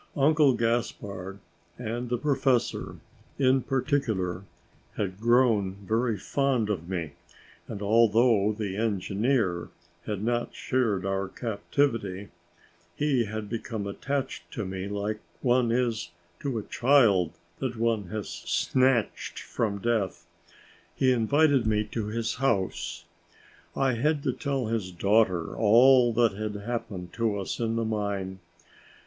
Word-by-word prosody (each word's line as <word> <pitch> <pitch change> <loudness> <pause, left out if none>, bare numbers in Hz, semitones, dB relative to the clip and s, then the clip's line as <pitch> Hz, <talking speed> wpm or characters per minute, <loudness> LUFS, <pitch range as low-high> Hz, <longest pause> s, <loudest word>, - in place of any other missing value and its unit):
Uncle 145 -1 +5
Gaspard 110 -5 -2 0.4
and 120 +1 -4
the 120 - 0
professor, 135 -2 0 0.4
in 130 -1 +3
particular, 115 - -1 0.5
had 95 -2 -3
grown 115 -5 +3
very 115 0 +1
fond 125 0 0
of 85 -3 -4
me 85 -5 -3 0.6
and, 100 - -6
although 110 0 +4
the 105 -3 -4
engineer 105 -2 0 0.4
had 105 -2 -3
not 120 +1 -1
shared 110 -7 0
our 95 0 -1
captivity, 105 -2 -2 0.7
he 140 -5 +1
had 110 0 -5
become 110 -1 -4
attached 135 +7 -3
to 110 - -3
me 95 +1 -4
like 105 +1 -3 0.2
one 125 -2 +3
is 115 -7 0 0.3
to 135 -5 -2
a 110 - -3
child 115 - +3 0.3
that 130 -2 -2
one 115 -3 +1
has 105 +3 -5
snatched 130 -4 0
from 105 -3 -2
death. 100 -6 -1 0.7
He 130 -1 +3
invited 135 +1 +3
me 105 -1 +2
to 110 -3 -2
his 115 +1 -2
house. 110 -9 -1 0.7
I 135 -2 +2
had 145 +5 0
to - - 0
tell 135 -4 -2
his 110 -4 -2
daughter 95 -2 +2
all 120 +3 +6
that 115 -1 +3
had 105 +1 -4
happened 100 -5 -5
to 110 -3 0
us 95 - -4
in 115 -1 0
the 115 0 0
mine. 100 -3 -2
110 Hz, 125 wpm, -27 LUFS, 100-125 Hz, 0.7 s, all